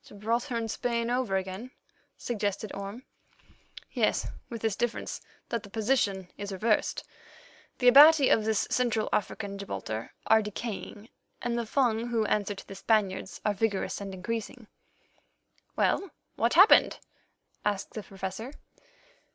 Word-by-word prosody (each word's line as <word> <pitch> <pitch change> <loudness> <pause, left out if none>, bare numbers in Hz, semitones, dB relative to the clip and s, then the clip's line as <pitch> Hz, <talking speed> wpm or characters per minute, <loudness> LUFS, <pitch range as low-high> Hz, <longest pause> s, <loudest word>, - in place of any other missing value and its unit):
"Gibraltar 230 +5 -2
and 225 -1 -2
Spain 235 0 -1
over 245 -6 0
again," 190 +6 -5 0.5
suggested 205 -3 -3
Orme. 200 +5 -6 0.9
"Yes, - - +1 0.2
with 230 -2 -7
this 220 -3 +1
difference—that 235 0 -4
the 205 - -12
position 205 -4 0
is 200 0 -5
reversed, 210 +3 0 0.7
the 250 - +2
Abati 285 +2 +9
of 220 - +4
this 220 -1 +1
Central 235 -3 +1
African 200 0 -2
Gibraltar 110 - -5
are 220 0 +5
decaying, 210 +1 -6 0.3
and 240 -1 -2
the 235 -1 -2
Fung, 235 -3 +1
who 230 -2 0
answer 205 -1 0
to - - -11
the - - -8
Spaniards, 195 -2 0
are 210 - +2
vigorous 205 -1 -1
and 200 -1 -5
increasing." 225 +5 -5 1.1
"Well, 395 - +1 0.3
what 235 +5 +1
happened?" 380 +5 +7 0.7
asked 205 -2 -1
the 215 - -4
Professor. 195 +6 -6
220 Hz, 130 wpm, -29 LUFS, 200-235 Hz, 1.1 s, Abati